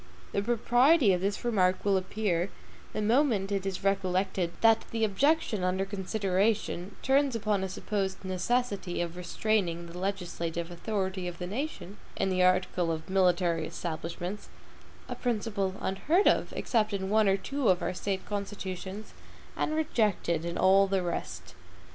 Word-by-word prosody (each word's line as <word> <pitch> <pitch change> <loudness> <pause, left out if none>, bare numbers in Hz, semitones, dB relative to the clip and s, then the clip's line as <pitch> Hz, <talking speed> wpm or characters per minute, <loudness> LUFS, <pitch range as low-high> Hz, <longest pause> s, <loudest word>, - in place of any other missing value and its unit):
The 200 - 0
proprietary 240 +4 +4
of 180 - 0
this 200 +4 -2
remark 185 -6 +2
will 200 -1 +3
appear, 185 -1 0 0.4
the 215 - -2
moment 220 -4 +2
it 195 -1 -1
is 190 -1 -4
recollected 190 -2 0
that 225 -1 +5
the 225 -1 -1
objection 225 - +2
under 185 +1 +1
consideration 195 -1 -1
turns 270 -1 +3
upon 210 -3 0
a 190 - -2
supposed 190 0 -3
necessity 190 0 -1
of 175 -1 -2
restraining 180 -1 -1
the 170 +1 -9
LEGISLATIVE 175 -3 -3
authority 190 0 -3
of 175 -1 -6
the 180 - -4
nation, 210 - -5 0.2
in 190 - 0
the 185 0 +1
article 180 -1 +2
of 160 +2 -5
military 175 -3 +2
establishments; 175 +4 -5 0.6
a - - -4
principle 210 -5 -1
unheard 305 - +1
of, - - +3
except 215 -3 0
in 190 0 -2
one 215 -1 +4
or 195 - +3
two 275 +4 -1
of 180 -1 +3
our 175 - -1
State 190 +1 -3
constitutions, 200 0 -5 0.4
and 310 - -1
rejected 210 - 0
in 170 0 -3
all 195 +1 +5
the 190 -1 0
rest. 90 - -5
195 Hz, 150 wpm, -29 LUFS, 180-215 Hz, 0.6 s, that